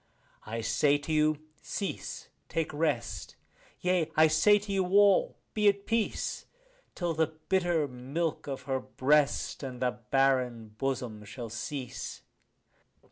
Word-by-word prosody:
I 115 +1 -3
say 120 +6 +3
to 145 +2 -4
you, 155 0 +3 0.2
cease, 200 - -5 0.2
take 160 -1 -1
rest; 155 +2 -1 0.5
yea, 180 -3 +1
I 155 - +7
say 205 +7 +5
to 205 0 -6
you 190 -1 +2
all, 200 0 +4 0.2
be 210 -1 +3
at 200 0 -1
peace, 225 -1 -1 0.5
Till 175 -2 -1
the 160 0 +2 0.2
bitter 175 -5 +2
milk 140 +7 -3
of 135 -2 -4
her 130 0 -1
breast 140 +3 +1
and 130 -3 -6
the 125 0 +1 0.2
barren 130 -4 +2
bosom 125 -5 -2
shall 115 +3 -7
cease. 125 +3 -5
145 Hz, 135 wpm, -30 LUFS, 130-175 Hz, 0.5 s, I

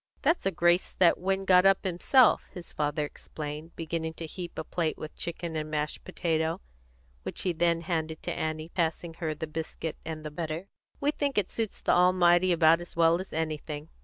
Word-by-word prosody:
"That's 325 - +2
a - - +2
grace 175 +1 +2
that 175 -2 +5
Win 195 +1 0
got 180 -1 +6
up 195 0 +4
himself," 200 +7 +4
his 175 -2 -9
father 150 0 0
explained, 150 +2 -7
beginning 160 0 -3
to 165 - -6
heap 175 +2 -7
a 160 - -2
plate 160 0 -2
with 155 - -8
chicken 170 -1 -4
and 155 0 -2
mashed 150 0 -2
potato, 160 +1 -1 0.6
which - - -5
he 180 - +1
then 170 0 +2
handed 160 -2 -3
to - - -2
Annie, 155 0 -3
passing 165 -1 -1
her 160 -3 -2
the 155 - -4
biscuit 160 0 -5
and 155 -1 -6
the 150 - -4
butter. 160 +3 -4 0.3
"We 290 - +2
think 285 -4 -2
it 200 -3 +1
suits 225 -3 -3
the - - +2
Almighty 180 0 +5
about 165 0 +5
as 175 - -10
well 165 +1 +4
as 190 - -10
anything." 155 -1 -3
165 Hz, 190 wpm, -28 LUFS, 155-180 Hz, 0.6 s, got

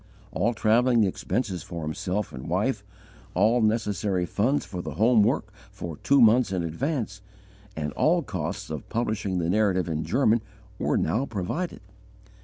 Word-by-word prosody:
All 115 +5 0
travelling 115 +2 +3
expenses 95 -1 -2
for 85 +1 -6
himself 90 +6 -3
and 65 0 -7
wife, - - 0 0.5
all 110 +6 +3
necessary 105 -4 0
funds 120 - 0
for 90 -2 -5
the - - -6
home 115 +1 +4
work 105 -2 +1 0.2
for 85 -6 -7
two 140 0 +3
months 115 -2 +5
in 90 -3 -1
advance, 105 - -3 0.6
and 75 -2 -3
all - - +2
costs - - -4
of - - -6
publishing 105 -5 -1
the 85 -2 0
Narrative 95 -2 +2
in 80 -1 -2
German, 120 -2 +2 0.4
were - - +1
now 115 - 0
provided. 110 - -3
105 Hz, 150 wpm, -26 LUFS, 90-120 Hz, 0.6 s, months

